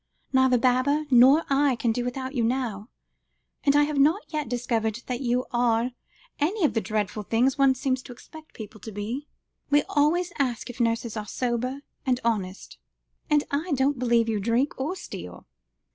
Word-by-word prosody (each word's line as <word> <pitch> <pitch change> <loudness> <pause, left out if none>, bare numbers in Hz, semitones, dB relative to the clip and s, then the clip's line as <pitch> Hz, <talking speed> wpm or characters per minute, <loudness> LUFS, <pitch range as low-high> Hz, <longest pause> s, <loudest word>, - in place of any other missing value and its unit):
Neither 260 -1 +4
Baba 260 +5 +2
nor 260 +6 +7
I 275 -1 +3
can 235 0 0
do 240 +2 -1
without 260 +2 -4
you 245 -4 0
now. 230 -3 -2 0.7
And 280 0 +3
I 290 - +6
have 290 -1 -1
not 320 - +4
yet 300 -5 -2
discovered 235 -2 -1
that 250 0 -3
you 250 0 0
are 240 0 +1 0.5
any 350 +5 +1
of - - +1
the 225 - 0
dreadful 210 0 -2
things 245 +7 +1
one 270 -1 +5
seems 260 0 -1
to 255 - -11
expect 310 +6 -14
people 215 0 -9
to 220 - -8
be. 225 +8 -5 0.4
We 290 0 +4
always 340 +5 +2
ask 245 -3 -1
if 245 - -15
nurses 230 -1 0
are 210 -1 -5
sober 250 +4 -2 0.2
and 255 -3 +1
honest; 200 -5 -2 0.5
and 295 -1 +3
I 300 +4 -1
don't 270 0 +1
believe 235 -2 +2
you 220 -2 0
drink 235 +7 +1
or 315 +8 -2
steal." - - -9
255 Hz, 175 wpm, -26 LUFS, 230-285 Hz, 0.7 s, nor